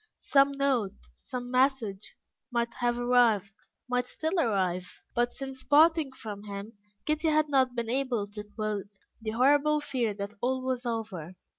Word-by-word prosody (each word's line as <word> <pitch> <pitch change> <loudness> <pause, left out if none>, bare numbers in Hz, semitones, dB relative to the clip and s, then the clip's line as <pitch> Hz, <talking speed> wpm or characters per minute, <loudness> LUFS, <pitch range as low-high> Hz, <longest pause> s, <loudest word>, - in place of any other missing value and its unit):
Some 275 0 +3
note, 265 -8 +1 0.3
some 245 -2 -5
message, 255 -6 +1 0.4
might 235 -1 0
have 240 -1 +1
arrived 240 -5 +3 0.3
might 250 0 0
still 320 +7 -1
arrive; 185 - 0
but 240 0 +1
since 265 -1 -7
parting 315 -1 +5
from 210 -5 -8
him, 200 +2 -6 0.3
Kitty 310 +1 +1
had 310 -1 +3
not 260 -3 +3
been 235 -1 -2
able 255 -5 0
to 210 0 -6
quell 210 -1 -3 0.4
the 220 - -3
horrible 290 +5 +4
fear 255 -7 -1
that 200 +1 -5
all 260 +1 0
was 255 -1 -2
over. 205 -7 -4
245 Hz, 150 wpm, -29 LUFS, 215-275 Hz, 0.4 s, parting